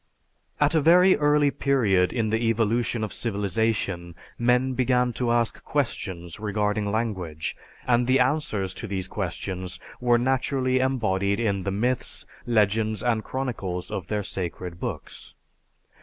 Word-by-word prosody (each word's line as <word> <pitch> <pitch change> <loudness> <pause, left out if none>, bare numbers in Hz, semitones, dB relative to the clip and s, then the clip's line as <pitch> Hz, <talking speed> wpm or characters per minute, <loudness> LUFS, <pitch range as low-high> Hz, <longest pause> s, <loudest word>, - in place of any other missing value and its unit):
At 145 +1 +3
a 160 - +3
very 180 +5 +6
early 145 -1 +3
period 105 -12 +2
in 110 -3 -1
the 115 +1 +1
evolution 115 +1 +1
of 110 - -3
civilization 100 -5 -1 0.2
men 125 +2 +2
began 125 -1 +2
to 120 +1 -1
ask 120 -1 0
questions 95 - -3
regarding 105 0 -1
language, 95 -9 -2 0.3
and 120 0 +2
the 130 +1 +4
answers 125 -9 0
to 110 - -7
these 95 -2 -3
questions 95 -1 -4 0.2
were 120 -1 +4
naturally 130 +1 +1
embodied 105 -7 +1
in 100 -4 0
the 100 - -2
myths, 120 +5 -1 0.2
legends, 110 -1 +2
and 115 -3 +1
chronicles 105 -9 -4
of 90 -3 -4
their 105 0 -1
sacred 90 -2 -5
books. - - -6
110 Hz, 135 wpm, -25 LUFS, 100-125 Hz, 0.3 s, very